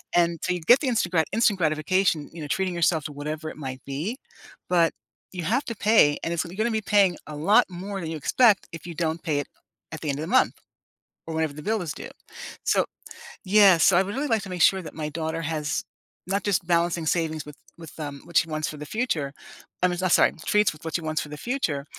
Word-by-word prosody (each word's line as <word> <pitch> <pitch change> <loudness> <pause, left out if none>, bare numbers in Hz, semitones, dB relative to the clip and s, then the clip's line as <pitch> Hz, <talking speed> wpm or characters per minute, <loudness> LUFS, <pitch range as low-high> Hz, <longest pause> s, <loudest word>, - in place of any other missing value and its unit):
And 170 -1 +2
so - - +1
you 180 - -3
get 240 +11 +6
the 290 - -1
instant 225 -8 0
grat 160 -3 +3
instant 215 -3 +3
gratification, 155 0 +1
you 165 - -8
know, 150 - -5
treating 185 +5 -1
yourself 165 -2 +2
to 150 - -4
whatever 155 +2 -5
it - - -10
might 130 -3 -6
be, 155 - -3 0.5
but 170 -2 +4 0.4
you 180 -2 -4
have 240 - 0
to 230 - -4
pay, 205 -9 +4
and 165 - -1
it's 170 - 0
lee 170 +2 -9
you're 215 - 0
gonna 235 - 0
be 220 -1 0
paying 200 -3 +3
a 150 - -7
lot 200 +11 +4
more 190 +2 -6
than 160 - -4
you 160 - -4
expect 210 - +3
if 165 - -8
you 170 - -7
don't 160 0 -2
pay 155 -4 0
it 145 - -4 0.5
at 160 - -7
the 155 - -3
end 140 - -1
of - - -3
the - - -5
month, 255 +8 +3 0.7
or 165 - -5
whenever 160 -2 0
the 150 - -9
bill 220 +4 0
is 160 -4 -4
due. - - -8 0.5
So - - +2 0.6
yeah, 195 -2 +6
so 175 +2 +5
I 190 - +5
would 200 +3 -5
really 285 +3 -1
like 225 -5 +1
to 195 - -8
make 180 -1 -4
sure 190 +2 +4
that 155 - -10
my 150 -1 -3
daughter 160 +1 -3
has, 155 -1 -2 0.4
not 195 +1 -1
just 200 -4 0
balancing 170 -1 +1
savings 160 -2 -1
with 150 -1 -11 0.2
with, 165 -1 -12
um, 145 -2 -6
what 170 - -1
she 165 - +3
wants 155 0 -2
for 155 - -8
the 150 - -7
future 155 - -2 0.5
I - - +6
mean, 175 -1 -2
s 185 - +3
sorry, - - +4
treats 210 -5 +3
with 155 - -16
what 160 - -3
she 170 - 0
wants 155 -1 -2
for 150 - -7
the 150 - -7
future, 165 - -2
170 Hz, 250 wpm, -25 LUFS, 155-195 Hz, 0.7 s, get